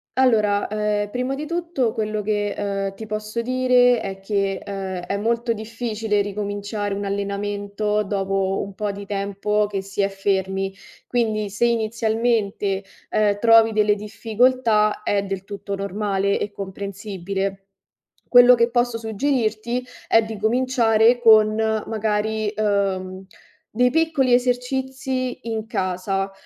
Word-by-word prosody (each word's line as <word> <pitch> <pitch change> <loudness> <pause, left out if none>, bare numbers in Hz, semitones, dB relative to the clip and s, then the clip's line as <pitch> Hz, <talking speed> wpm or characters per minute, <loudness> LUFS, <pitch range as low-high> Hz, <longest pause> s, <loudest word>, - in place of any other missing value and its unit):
allora, 215 -6 +3
ehm, 210 -1 -1
prima 250 +4 -2
di 295 +2 -5
tutto 335 -9 -1
quello 215 -2 -2
che, 205 0 -1
uhm, 195 -1 -2
ti 220 +1 -8
posso 215 +2 -3
dire 250 -1 +3
è 195 0 -5
che, 195 -1 -1
uhm, 190 -2 -4
è 200 - -1
molto 230 +2 0
difficile 220 -1 -2
ricominciare 205 0 -3
un 200 +1 -3
allenamento 205 +1 -2
dopo 195 -1 -1
un 200 -1 -9
po' 210 0 -2
di 200 0 -9
tempo 200 +1 0
che 200 -2 -3
si 195 +1 -3
è 200 - +2
fermi. 195 0 -1 0.4
Quindi 215 -4 0
se 210 +4 0
inizialmente, 220 -3 0 0.3
uhm, 205 -1 +2
trovi 225 0 +6
delle 210 -1 +3
difficoltà 220 0 +1
è 200 -1 +1
del 195 0 -5
tutto 200 -1 -6
normale 200 0 -1
e 205 - -3
comprensibile. 195 0 -5 0.6
Quello 245 0 +8
che 235 0 +2
posso 240 -1 +1
suggerirti 230 0 -1 0.2
è 225 - +5
di 220 -1 -6
cominciare 235 0 +3
con 215 -2 +6
magari, 220 -1 -1
uhm, 195 -3 -1 0.5
dei 250 +2 +4
piccoli 305 -4 +2
esercizi 255 0 -2
in 220 -1 -3
casa, 195 -2 -2
210 Hz, 130 wpm, -22 LUFS, 200-230 Hz, 0.6 s, Quello